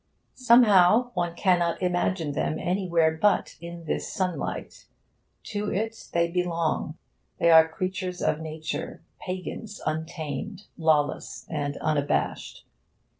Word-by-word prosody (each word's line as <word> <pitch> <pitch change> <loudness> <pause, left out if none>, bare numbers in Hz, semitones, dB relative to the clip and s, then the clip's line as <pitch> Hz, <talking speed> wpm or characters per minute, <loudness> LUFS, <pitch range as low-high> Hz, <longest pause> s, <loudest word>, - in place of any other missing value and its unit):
Somehow, 235 -2 +5
one 175 -2 -2
cannot 175 -3 +2
imagine 180 -3 0
them 155 +2 -1
anywhere 170 -3 +1
but 210 -1 +2
in 170 0 -8
this - - -3
sunlight. 185 -2 -4 0.6
To 210 -1 -3
it 220 +3 -3
they 170 0 +2
belong. 170 -3 -1 0.4
They 170 - +4
are 160 0 +8
creatures 185 +1 -4
of 150 - 0
Nature, 155 0 -5 0.2
pagans 190 +3 -6
untamed, 160 +4 -4
lawless 155 -2 0
and 145 -2 -2
unabashed. 145 -2 -1
175 Hz, 110 wpm, -26 LUFS, 160-190 Hz, 0.6 s, are